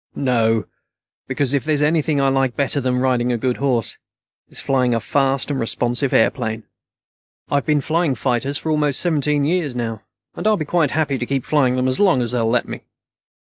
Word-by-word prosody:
"No, 115 Hz, -5 st, +1 dB, 0.6 s
because 135 Hz, 0 st, -1 dB
if 140 Hz, -, +1 dB
there's 150 Hz, -1 st, +1 dB
anything 155 Hz, -1 st, +1 dB
I 135 Hz, -, +2 dB
like 135 Hz, -2 st, 0 dB
better 140 Hz, 0 st, 0 dB
than 125 Hz, -1 st, 0 dB
riding 125 Hz, -1 st, +1 dB
a 120 Hz, -, 0 dB
good 125 Hz, +2 st, -1 dB
horse, 125 Hz, -6 st, -1 dB, 0.5 s
it's -, -, -6 dB
flying 125 Hz, -3 st, +1 dB
a -, -, +1 dB
fast 135 Hz, +3 st, 0 dB
and 135 Hz, -, -2 dB
responsive 120 Hz, +3 st, -1 dB
airplane. 110 Hz, -1 st, +1 dB, 0.9 s
I've 140 Hz, 0 st, 0 dB
been 150 Hz, -2 st, +2 dB
flying 160 Hz, -2 st, 0 dB
fighters 135 Hz, +3 st, -1 dB
for 160 Hz, -, -3 dB
almost 150 Hz, -3 st, +1 dB
seventeen 150 Hz, -4 st, +1 dB
years 160 Hz, -5 st, -1 dB
now, 115 Hz, -3 st, -3 dB, 0.3 s
and -, -, -3 dB
I'll 215 Hz, -1 st, +3 dB
be 155 Hz, -, -3 dB
quite 160 Hz, -2 st, +1 dB
happy 145 Hz, -3 st, -1 dB
to 120 Hz, -, -2 dB
keep 135 Hz, -2 st, -2 dB
flying 135 Hz, -5 st, +2 dB
them 130 Hz, 0 st, 0 dB
as 130 Hz, -, -1 dB
long 180 Hz, -11 st, +3 dB
as 120 Hz, -, -3 dB
they'll 115 Hz, -2 st, 0 dB
let 120 Hz, +1 st, +1 dB
me. -, -, -7 dB
135 Hz, 195 wpm, -20 LUFS, 125-150 Hz, 0.9 s, I'll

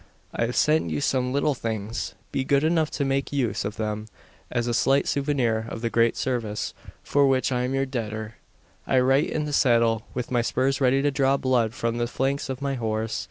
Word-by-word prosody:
I 115 Hz, -, 0 dB
have 125 Hz, -, -4 dB
sent 155 Hz, +1 st, +3 dB
you -, -, -1 dB
some 130 Hz, -3 st, 0 dB
little 145 Hz, +2 st, +1 dB
things. 110 Hz, -2 st, -4 dB, 0.2 s
Be 135 Hz, -, -1 dB
good 140 Hz, +1 st, +2 dB
enough 160 Hz, -1 st, +2 dB
to 140 Hz, -, -2 dB
make 135 Hz, 0 st, -1 dB
use 120 Hz, -8 st, 0 dB
of 105 Hz, +1 st, -4 dB
them, 105 Hz, 0 st, -3 dB, 0.4 s
as 120 Hz, -1 st, -1 dB
a 120 Hz, -, -1 dB
slight 135 Hz, +4 st, +2 dB
souvenir 125 Hz, -6 st, 0 dB
of 115 Hz, -, -6 dB
the 115 Hz, -1 st, -1 dB
great 115 Hz, 0 st, +2 dB
service 115 Hz, -5 st, -2 dB, 0.3 s
for 140 Hz, -1 st, +3 dB
which 130 Hz, 0 st, +2 dB
I 125 Hz, -1 st, 0 dB
am 130 Hz, +2 st, -2 dB
your 135 Hz, 0 st, +1 dB
debtor. 110 Hz, -4 st, -4 dB, 0.5 s
I 130 Hz, -, +3 dB
write 135 Hz, +3 st, +3 dB
in 150 Hz, -1 st, -1 dB
the 150 Hz, -, -4 dB
saddle, 115 Hz, -4 st, +3 dB
with 125 Hz, -1 st, -4 dB
my 120 Hz, -1 st, +2 dB
spurs 130 Hz, +3 st, 0 dB
ready 135 Hz, +1 st, +3 dB
to 145 Hz, -, +2 dB
draw 135 Hz, -1 st, +2 dB
blood 125 Hz, -4 st, +1 dB
from 115 Hz, -1 st, -1 dB
the 120 Hz, -, 0 dB
flanks 135 Hz, +3 st, -1 dB
of 130 Hz, +1 st, -4 dB
my 140 Hz, -1 st, 0 dB
horse. 110 Hz, -3 st, -2 dB
125 Hz, 210 wpm, -25 LUFS, 115-135 Hz, 0.5 s, sent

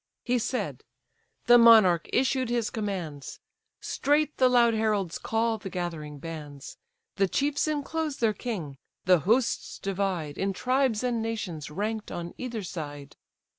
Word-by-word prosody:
He 245 Hz, 0 st, +1 dB
said; 205 Hz, -, -3 dB, 0.6 s
the 240 Hz, +1 st, +7 dB
monarch 215 Hz, -8 st, +6 dB
issued 260 Hz, -1 st, +1 dB
his 235 Hz, -2 st, 0 dB
commands; 180 Hz, -10 st, -5 dB, 0.4 s
Straight 295 Hz, +1 st, +1 dB
the 255 Hz, -1 st, +5 dB
loud 240 Hz, -2 st, +4 dB
heralds 210 Hz, -6 st, 0 dB
call 225 Hz, 0 st, 0 dB
the 195 Hz, -, -7 dB
gathering 165 Hz, -5 st, -5 dB
bands; 145 Hz, -3 st, -8 dB, 0.4 s
The 195 Hz, -1 st, +3 dB
chiefs 285 Hz, -, 0 dB
inclose 305 Hz, 0 st, -2 dB
their 225 Hz, -2 st, +2 dB
king; 180 Hz, -, -5 dB, 0.3 s
the 180 Hz, -1 st, +5 dB
hosts 230 Hz, -, 0 dB
divide, 185 Hz, -6 st, -2 dB
In 195 Hz, 0 st, 0 dB
tribes 255 Hz, 0 st, +1 dB
and 240 Hz, -2 st, 0 dB
nations 210 Hz, -9 st, -4 dB
rank'd 210 Hz, +6 st, -3 dB
on 170 Hz, 0 st, -5 dB
either 235 Hz, -4 st, -4 dB
side. 145 Hz, -5 st, -7 dB
215 Hz, 135 wpm, -27 LUFS, 170-245 Hz, 0.6 s, the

